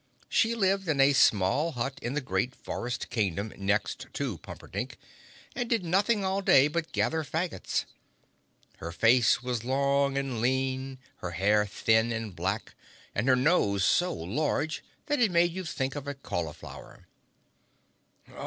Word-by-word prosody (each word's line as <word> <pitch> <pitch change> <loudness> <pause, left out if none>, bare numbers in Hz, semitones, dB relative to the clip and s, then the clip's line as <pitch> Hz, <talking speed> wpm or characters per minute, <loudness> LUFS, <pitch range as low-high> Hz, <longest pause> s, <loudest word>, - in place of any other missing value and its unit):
She 230 0 +2
lived 195 -3 +1
in 150 -3 0
a 135 +1 +6
small 130 - +3
hut 135 +2 -3
in 120 +4 -3
the 150 - 0
great 130 -1 -1
forest 120 +1 -5
kingdom 100 -1 -1
next 100 +2 -1
to - - -3
Pumperdink - - -7 0.6
and 240 -1 -2
did 225 -6 +1
nothing 200 +4 +2
all 190 +1 0
day 140 -7 +6
but 165 +1 -3
gather 160 0 0
faggots. 155 - -2 0.9
Her 85 - -6
face 115 +5 +4
was 125 -3 -2
long 140 +1 +1
and 135 -5 -2
lean, 130 +1 -1 0.2
her 90 -1 -6
hair 105 +2 +3
thin 110 +3 +2
and 110 -4 -4
black 95 +5 -3 0.4
and 105 +5 -1
her 130 - +6
nose 125 - +2
so 180 0 +3
large 150 - -2 0.2
that 295 -2 0
it 235 -4 +4
made 175 0 +3
you 185 +2 -5
think 135 -5 -3
of 145 -1 -6
a 145 - -3
cauliflower. 85 - -7
135 Hz, 150 wpm, -28 LUFS, 110-165 Hz, 0.9 s, a